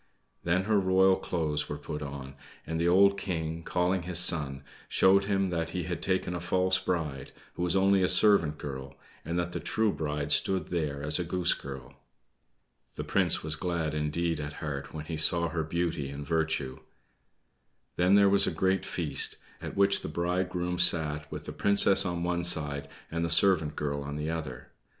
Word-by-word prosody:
Then 90 +2 +1
her 105 0 +2
royal 95 0 +4
clothes 80 -5 -2
were 75 - -4
put 75 +1 -7
on, 70 -2 -7 0.3
and 80 0 -3
the 85 - +1
old 100 +2 +4
King, 80 -3 -4
calling 90 +2 0
his 90 0 -4
son, 75 -6 +3 0.3
showed 100 +1 +4
him 95 -2 0
that 85 -1 -2
he 90 - -2
had 85 0 -5
taken 95 -1 -1
a 90 - -3
false 90 +1 +1
bride, 75 -7 -3 0.2
who - - -7
was 90 0 +1
only 95 0 +3
a 90 - +2
servant 85 -8 +4
girl, 70 -1 -7 0.3
and 85 +3 -3
that 85 0 -2
the - - -4
true 110 -2 0
bride 75 -2 -3
stood 95 -4 +2
there 75 -5 -3
as 75 +2 -1
a - - 0
Goose 90 +1 +2
Girl. 65 -2 -9 1.0
The - - -4
prince - - +1
was 80 0 -3
glad 85 -4 -2
indeed 75 +2 -1
at 75 0 -5
heart 75 -2 -6
when 75 -1 -7
he 80 0 -5
saw 85 +2 +2
her 85 -1 -2
beauty 80 -3 -2
and 70 +1 -7
virtue. 80 -5 -2 1.2
Then 90 +3 +3
there 100 -1 +6
was 100 0 +4
a - - 0
great 95 0 0
feast, 75 -6 0 0.3
at - - -7
which 100 0 +3
the - - -5
bridegroom 90 +1 -2
sat, 75 -4 +2
with - - -7
the - - -6
Princess 100 -1 +4
on 85 -1 -3
one 85 0 -1
side 75 -4 0 0.2
and 85 +1 -2
the 85 - -1
servant 80 -3 +4
girl 70 -1 -3
on 70 +1 -6
the 75 +2 -3
other. 75 -7 -6
85 Hz, 185 wpm, -28 LUFS, 75-90 Hz, 1.2 s, there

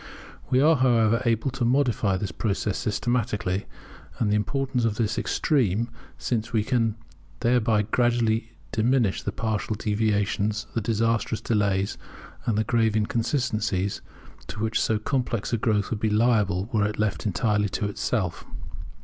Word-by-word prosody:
We 130 - +3
are, 155 +1 +5
however, 115 -3 +3
able 115 +3 +1
to 125 - -3
modify 120 -6 +2
this 100 0 -3
process 100 -2 -1
systematically; 105 -4 -1 0.5
and 105 -3 +1
the - - +3
importance 125 +4 -1
of 115 -2 +1
this 110 -1 0
is - - -3
extreme, 120 - +1 0.3
since 115 -1 -2
we 110 -3 +1
can 115 -1 +1 0.5
thereby 115 -3 +3
greatly 115 0 +1 0.2
diminish 115 -2 +2
the 105 - -3
partial 110 0 -2
deviations, 105 0 0
the 115 - 0
disastrous 115 0 0
delays, 100 -3 0 0.5
and 110 -3 +1
the 110 - +2
grave 115 -1 +1
inconsistencies 110 -3 0 0.5
to - - -7
which 110 0 0
so 110 - +2
complex 120 -1 -2
a - - +3
growth 105 -2 0
would 110 - -1
be 110 - +1
liable 105 -4 +2
were 105 -2 +3
it 105 - -5
left 105 0 -1
entirely 105 0 +1
to 105 - -2
itself. 100 -3 -2
110 Hz, 150 wpm, -25 LUFS, 105-120 Hz, 0.5 s, are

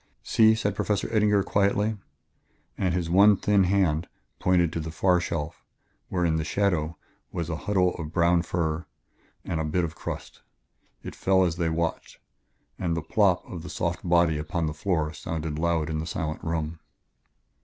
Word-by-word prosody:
"See," 110 -1 +5
said 105 -3 -1
Professor 100 -1 0
Eddinger 105 -2 +3
quietly. 100 +2 +1 0.8
And 95 - 0
his 90 -2 -1
one 100 +4 +6
thin 100 -1 +3
hand 90 -4 +1 0.3
pointed 85 -3 +2
to - - -2
a 80 0 -4
far 90 +3 +2
shelf, 80 -3 -4 0.5
where, 90 -2 0
in 80 -1 +2
the 80 - -1
shadow, 85 -2 0 0.3
was 85 -2 -3
a - - -1
huddle 90 -3 +3
of 80 -3 -6
brown 85 0 +3
fur 85 -1 -2 0.6
and 85 - -2
a - - 0
bit 80 +3 0
of 80 -2 -3
crust. - - -7 0.6
It - - -7
fell 95 0 +3
as 85 -2 0
they 85 -2 0
watched, 80 0 -2 0.6
and 85 -2 -1
the 85 - -3
"plop" 95 0 +2
of 85 - -7
the 90 - -8
soft 85 0 -2
body 85 -3 +3
upon 80 +2 -2
the 75 - -2
floor 80 -1 -1
sounded 80 -1 -4
loud 85 -2 +1
in 80 -1 -2
the 80 - -4
silent 80 -2 -4
room. 80 0 -3
85 Hz, 175 wpm, -26 LUFS, 80-95 Hz, 0.8 s, one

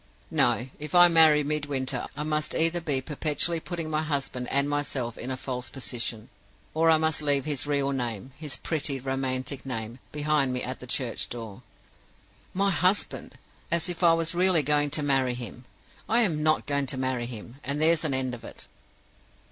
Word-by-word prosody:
No. 120 0 +3
If 150 +3 -4
I 175 0 +9
marry 160 -3 +6
Midwinter, 140 -3 -2
I 150 - -2
must 155 0 -1
either 165 +2 +3
be 145 -5 0
perpetually 155 +3 -1
putting 170 -1 -5
my 155 0 0
husband 140 -5 -3
and 140 +1 +2
myself 140 -5 -2
in 125 - -6
a 130 - -2
false 125 -1 -5
position 120 -3 -4 0.4
or 165 +1 +3
I 160 - +6
must 160 -1 +1
leave 145 -2 +2
his 145 -3 -1
real 140 -1 +1
name, 125 -2 -4
his 150 -2 -4
pretty, 145 -4 -2
romantic 130 0 -3
name, 115 -2 -5
behind 150 -3 +1
me 125 - -2
at 130 +1 -5
the 125 - -10
church 120 -1 -1
door. 115 -4 -7 0.9
"My 195 +1 +1
husband! 185 +3 0 0.3
As 170 0 0
if 175 0 -5
I 170 -2 +6
was 165 +1 0
really 180 -2 +3
going 145 +1 +2
to 150 +1 +2
marry 135 -3 +1
him! 125 0 -9 0.4
I 235 +2 +4
am 165 -9 +1
not 155 0 +2
going 140 -1 0
to 130 - 0
marry 130 -2 -2
him, 120 +1 -9
and 140 +2 -2
there's 165 +1 +4
an 145 -4 +1
end 130 -1 -1
of 120 - -8
it. - - -10
145 Hz, 185 wpm, -27 LUFS, 130-155 Hz, 0.9 s, I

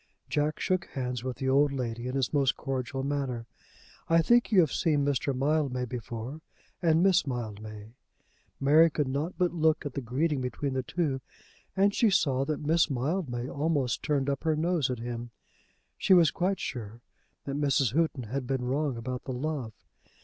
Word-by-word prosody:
Jack 150 +1 0
shook 185 -2 0
hands 125 -3 -4
with 130 -1 -4
the 130 - -3
old 140 +2 +4
lady 120 -3 -3
in 130 - -3
his 135 0 0
most 135 -2 +2
cordial 135 0 -3
manner. 135 -4 -2 0.6
"I 165 0 +5
think 240 +6 +4
you 200 - +6
have 160 - +1
seen 145 -3 +2
Mr. 140 0 0
Mildmay 135 -1 0
before, 120 +4 -6 0.4
and 165 -1 +3
Miss 190 -5 +4
Mildmay." 110 -3 -6 0.7
Mary 155 +4 +6
could 150 -2 -1
not 145 +6 -2
but 180 -2 +1
look 160 -2 +2
at 145 - -4
the 140 - -3
greeting 135 +4 0
between 130 +2 -3
the 130 - 0
two, 140 -2 -2 0.6
and 200 +1 +4
she 225 - +3
saw 135 -8 +2
that 150 0 -3
Miss 160 +2 +3
Mildmay 130 -2 -2
almost 145 -3 0
turned 140 -3 0
up 140 -1 -1
her 160 -1 +2
nose 160 -3 +1
at 125 - -2
him. 120 +1 -5 0.7
She 190 - +5
was 170 -4 +6
quite 190 +2 0
sure 115 -2 -6 0.4
that 140 - -3
Mrs. 140 -4 +2
Houghton 155 -4 +1
had 125 +3 -4
been 130 -2 -1
wrong 135 0 -1
about 125 +2 -5
the 130 - -3
love. 135 -3 -3
140 Hz, 180 wpm, -29 LUFS, 125-155 Hz, 0.7 s, you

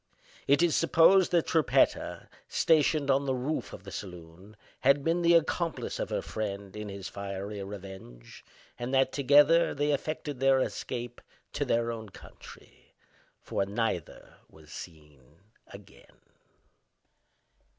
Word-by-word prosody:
It 140 +4 +4
is 170 -3 +2
supposed 165 +3 +5
that 170 -2 +2
Trippetta, 160 -5 +1 0.2
stationed 155 -3 +2
on 140 +1 +1
the 130 - +1
roof 135 +5 -3
of - - -10
the 100 - -10
saloon, 90 +2 -10 0.2
had 140 +1 +3
been 165 +3 +1
the 170 0 +5
accomplice 165 +1 -1
of - - -3
her - - -2
friend 100 -2 -5
in 105 -1 -6
his 100 -1 -7
fiery 100 +1 -6
revenge, 95 -11 -10 0.4
and 125 +2 -2
that, 135 0 +3
together, 145 +4 +4
they 145 +1 0
effected 145 -1 -4
their 135 0 +4
escape 120 -2 -4 0.3
to - - -1
their 115 0 0
own 110 -2 -7
country; - - -16 0.5
for - - -1
neither 100 -5 -4
was 80 0 -18
seen 75 -4 -12 0.3
again. 100 0 -16
120 Hz, 130 wpm, -29 LUFS, 100-145 Hz, 0.5 s, supposed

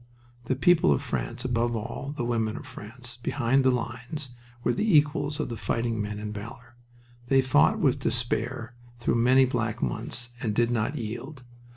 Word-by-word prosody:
The 130 - 0
people 175 +5 +4
of 140 - +2
France 125 -1 -3
above 120 -1 +1
all, 125 +6 -5
the 120 - -1
women 115 -2 0
of - - -8
France 120 -1 -9
behind 130 +1 +2
the 130 - +5
lines, 125 +3 -3 0.3
were 120 - +2
the 200 - +4
equals 145 0 +1
of - - -1
the 115 - -3
fighting 115 -1 -1
men 105 0 -3
in 105 0 -5
valor. 115 +3 -9 0.5
They 135 +1 +4
fought 130 - +4
with - - +2
despair, 120 0 -1 0.2
through 120 - 0
many 125 +3 +5
black 115 -3 -1
months, 120 - -2
and 110 -5 -1
did 120 +1 +3
not 120 +5 0
yield. 125 +4 -6
120 Hz, 175 wpm, -27 LUFS, 115-130 Hz, 0.5 s, the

